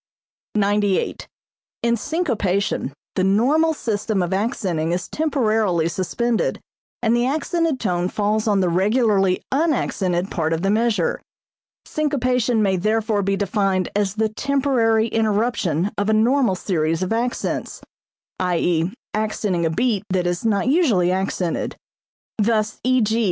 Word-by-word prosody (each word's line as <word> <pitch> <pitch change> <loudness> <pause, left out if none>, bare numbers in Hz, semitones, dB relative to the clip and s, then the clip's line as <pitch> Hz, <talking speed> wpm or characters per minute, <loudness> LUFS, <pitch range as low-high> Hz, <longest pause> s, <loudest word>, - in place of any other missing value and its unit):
98. 205 -1 0 0.6
In 235 0 +3
syncopation 210 - -1 0.2
the 185 - +1
normal 260 +12 +3
system 210 -5 -1
of 175 +2 -2
accenting 190 -6 -1
is 175 0 -3
temporarily 220 - +1
suspended 225 +7 -1 0.4
and 230 0 +3
the 240 +1 +2
accented 315 0 0
tone 180 -3 0
falls 210 +2 0
on 200 -2 +3
the 180 - +2
regularly 195 0 +2
unaccented 210 - 0
part 165 -2 0
of 165 +2 -2
the 195 - +2
measure. 215 -5 +1 0.6
Syncopation 250 -6 0
may 190 -2 +2
therefore 215 +2 0
be 195 0 0
defined 195 -2 0
as 200 -1 0
the 220 0 +1
temporary 235 -3 +1
interruption 210 -5 0
of 205 +1 0
a - - +3
normal 235 -1 +3
series 165 -2 -1
of 185 - -1
accents, 240 +2 -2 0.6
i.e., 175 -1 +1 0.2
accenting 210 -5 -1
a - - +2
beat 215 +3 0
that 185 -1 0
is 175 0 -1 0.2
usually 255 - +3
not 185 - +2
accented. 180 -3 -2 0.6
Thus 215 0 +1
_e.g. 230 -3 +2
210 Hz, 130 wpm, -21 LUFS, 185-235 Hz, 0.6 s, In